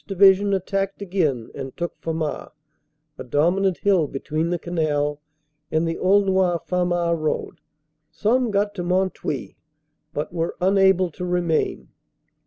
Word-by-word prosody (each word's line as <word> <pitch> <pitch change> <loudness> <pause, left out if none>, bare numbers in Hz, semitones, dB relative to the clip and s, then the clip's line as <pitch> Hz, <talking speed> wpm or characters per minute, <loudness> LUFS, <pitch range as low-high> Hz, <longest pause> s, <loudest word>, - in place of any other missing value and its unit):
Division 195 +1 +5
attacked 195 +1 -2
again 155 - -1
and 135 -1 -7
took 175 0 -3
Famars, 160 -2 -3 0.7
a - - -4
dominant 175 +8 +1
hill 190 -7 +2
between 155 +4 -2
the 175 - 0
Canal 150 -4 -1 0.5
and 160 +1 +1
the 165 - -3
Aulnoy 190 -2 +3
Famars 175 -2 0
road. 155 -1 -2 0.5
Some 245 +3 +1
got 205 0 0
to 180 -3 -4
Mont 185 +2 +1
Houy, 140 -4 -4 0.5
but 150 +3 -4
were 165 -1 -2
unable 190 -1 +3
to 180 - -7
remain. 175 -3 0
175 Hz, 130 wpm, -23 LUFS, 160-195 Hz, 0.7 s, Division